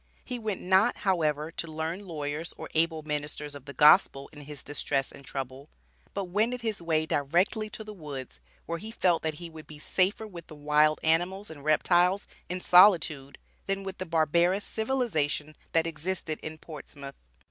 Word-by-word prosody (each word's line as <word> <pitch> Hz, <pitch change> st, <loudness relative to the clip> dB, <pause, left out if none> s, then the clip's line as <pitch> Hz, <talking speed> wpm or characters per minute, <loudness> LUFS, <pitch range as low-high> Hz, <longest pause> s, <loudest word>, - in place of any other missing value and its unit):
He 250 Hz, -1 st, -4 dB
went 215 Hz, -4 st, -3 dB
not, 190 Hz, +6 st, +3 dB
however, 155 Hz, -4 st, +1 dB
to 170 Hz, -, -4 dB
learned 165 Hz, +5 st, -4 dB
lawyers 155 Hz, 0 st, -4 dB
or -, -, -7 dB
able 160 Hz, -1 st, +1 dB
ministers 150 Hz, -1 st, -3 dB
of 140 Hz, -2 st, -10 dB
the 140 Hz, -, -7 dB
Gospel 150 Hz, -2 st, +5 dB
in 150 Hz, -, -11 dB
his 145 Hz, -1 st, -8 dB
distress 140 Hz, -2 st, -2 dB
and 140 Hz, -, -13 dB
trouble, 135 Hz, +1 st, -6 dB, 0.5 s
but 200 Hz, -, -1 dB
wended 220 Hz, +7 st, 0 dB
his 220 Hz, -5 st, -2 dB
way 160 Hz, -2 st, +1 dB
"directly 175 Hz, -, +1 dB
to 220 Hz, -, -7 dB
the 215 Hz, 0 st, -8 dB
woods," 145 Hz, -8 st, -7 dB, 0.3 s
where 170 Hz, 0 st, -3 dB
he 215 Hz, -, -6 dB
felt 180 Hz, -7 st, +2 dB
that 160 Hz, -1 st, -2 dB
he 170 Hz, +2 st, -7 dB
would 160 Hz, -1 st, -11 dB
be 150 Hz, -, -9 dB
safer 190 Hz, +7 st, +1 dB
with 175 Hz, -6 st, -10 dB
the 155 Hz, -, -11 dB
wild 150 Hz, +1 st, +3 dB
animals 175 Hz, +4 st, +1 dB
and 145 Hz, -3 st, -11 dB
reptiles, 175 Hz, +5 st, +3 dB, 0.2 s
in 180 Hz, +1 st, -2 dB
solitude, 170 Hz, -8 st, +5 dB, 0.3 s
than 195 Hz, 0 st, -1 dB
with 190 Hz, 0 st, -6 dB
the 185 Hz, -, -4 dB
barbarous 170 Hz, +4 st, +2 dB
civilization 180 Hz, -, -1 dB, 0.2 s
that 165 Hz, 0 st, +3 dB
existed 165 Hz, 0 st, -3 dB
in 155 Hz, 0 st, -6 dB
Portsmouth. 145 Hz, -3 st, -9 dB
165 Hz, 175 wpm, -28 LUFS, 150-190 Hz, 0.5 s, Gospel